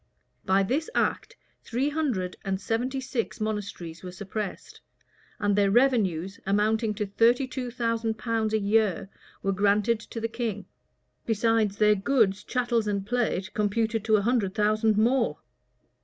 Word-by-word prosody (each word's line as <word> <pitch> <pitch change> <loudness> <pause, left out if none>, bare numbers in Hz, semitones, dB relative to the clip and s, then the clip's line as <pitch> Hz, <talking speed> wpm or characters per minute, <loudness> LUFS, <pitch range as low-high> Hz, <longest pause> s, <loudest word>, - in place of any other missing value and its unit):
By 195 +1 +3
this 275 +11 -1
act - - 0 0.3
three 255 +5 -1
hundred 255 - -1
and 195 -2 -2
seventy 245 +6 -1
six 255 -3 -3
monasteries 205 -6 -4
were 180 - -7
suppressed, 200 +2 -6 0.6
and 205 -1 +1
their 200 -1 +3
revenues, 200 -7 +2
amounting 210 +2 +1
to 210 - -2
thirty 230 +6 +3
two 255 -1 -4
thousand 230 -2 -1
pounds 225 -1 -1
a - - +2
year, 205 -1 +1 0.3
were 195 - +1
granted 205 +3 +2
to 225 +1 -8
the 225 - -1
king; 225 -4 -4 0.6
besides 225 -2 +1
their 210 -1 +5
goods, 205 -2 +1
chattels, 240 -3 0
and 200 -1 -1
plate, 215 -4 -1
computed 220 0 0
at 215 - +6
a 210 - +3
hundred 220 -5 +1
thousand 215 0 +2
pounds 215 - +3
more. 250 0 +1
215 Hz, 150 wpm, -27 LUFS, 200-235 Hz, 0.6 s, at